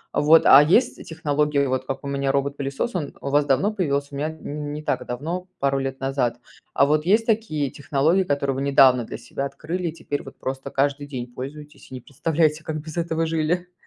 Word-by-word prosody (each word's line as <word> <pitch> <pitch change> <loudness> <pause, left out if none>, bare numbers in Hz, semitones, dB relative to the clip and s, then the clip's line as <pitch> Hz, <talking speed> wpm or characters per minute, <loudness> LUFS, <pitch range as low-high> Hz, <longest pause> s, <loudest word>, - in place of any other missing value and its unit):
Вот, 160 +2 +5
а 135 - +9
есть 180 - +2
технологии, 150 -2 0
вот, 130 0 -1
как 135 - -4
у - - -5
меня 140 -1 0
робот-пылесос, 140 - -2
он 150 -6 -3
у 140 - -3
вас 145 +1 +3
давно 145 +10 +2
появился? 140 -7 -1
У 140 - -6
меня 150 +2 -1
не 160 -2 -8 0.2
не 150 - -6
так 150 - -1
давно, 165 +9 -4
пару 135 0 +1
лет 135 0 -4
назад, 135 -3 -1 0.4
а 140 - +5
вот 150 +1 +2
есть 215 +5 +3
такие 160 - 0
технологии, 155 +6 +1
которые 140 -4 0
вы 135 - -3
недавно 135 -3 +5
для - - -7
себя 120 +3 -5
открыли 165 +6 -4
и - - -7
теперь 145 -3 -4
вот 135 - -12
просто 135 0 -5
каждый 140 +1 0
день 125 -3 -6
пользуетесь 145 +4 -9
и - - -6
не 130 - -6
представляете, 155 +3 0
как 155 0 -4
без 155 0 -9
этого 165 -1 0
жили? 165 +3 -1
145 Hz, 210 wpm, -23 LUFS, 135-160 Hz, 0.4 s, а